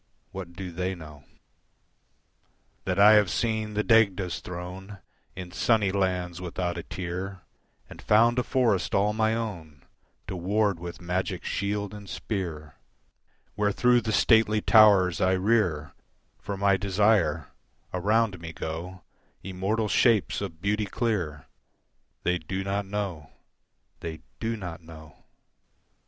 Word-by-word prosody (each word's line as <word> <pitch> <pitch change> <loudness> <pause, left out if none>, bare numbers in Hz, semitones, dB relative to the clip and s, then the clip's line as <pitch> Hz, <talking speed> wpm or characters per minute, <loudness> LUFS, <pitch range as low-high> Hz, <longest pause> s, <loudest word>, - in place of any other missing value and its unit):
What 95 -2 -7
do 90 0 -7
they 90 +2 -2
know? 75 -4 -12 1.6
That - - -1
I 105 +2 +8
have 105 -3 +5
seen 110 +1 -1
the 105 - +1
Dagda's 100 -7 +3
throne 90 +3 -8 0.4
In 90 -1 -7
sunny 105 0 +2
lands 90 -2 -1
without 90 0 -3
a 85 - -4
tear 90 +2 -5 0.5
And - - -12
found 115 +3 +4
a - - +1
forest 120 -7 +1
all 105 +2 +2
my 110 0 +1
own 85 -11 -6 0.4
To 95 - -5
ward 100 +1 0
with 85 0 -7
magic 90 +1 -2
shield 100 0 -2
and 100 -2 -10
spear, 85 -8 -5 0.8
Where, 105 +2 +1
through 125 +3 +3
the 110 - -2
stately 110 -1 +4
towers 100 -5 +5
I 95 0 +3
rear 95 -7 +1 0.5
For 100 -1 -5
my 100 0 +3
desire, 100 +1 +2 0.4
around 105 +1 +1
me 80 -1 -8
go 85 +3 -6 0.4
Immortal 95 +4 -1
shapes 110 -1 +2
of 85 -5 -7
beauty 105 +1 +1
clear: 95 - -2 0.8
They 90 0 +1
do 95 +4 -4
not 100 +1 -2
know, 95 -8 -4 0.7
they 80 -2 -6 0.2
do 115 0 -2
not 90 -4 -7
know. 80 -1 -14
95 Hz, 130 wpm, -27 LUFS, 90-105 Hz, 1.6 s, I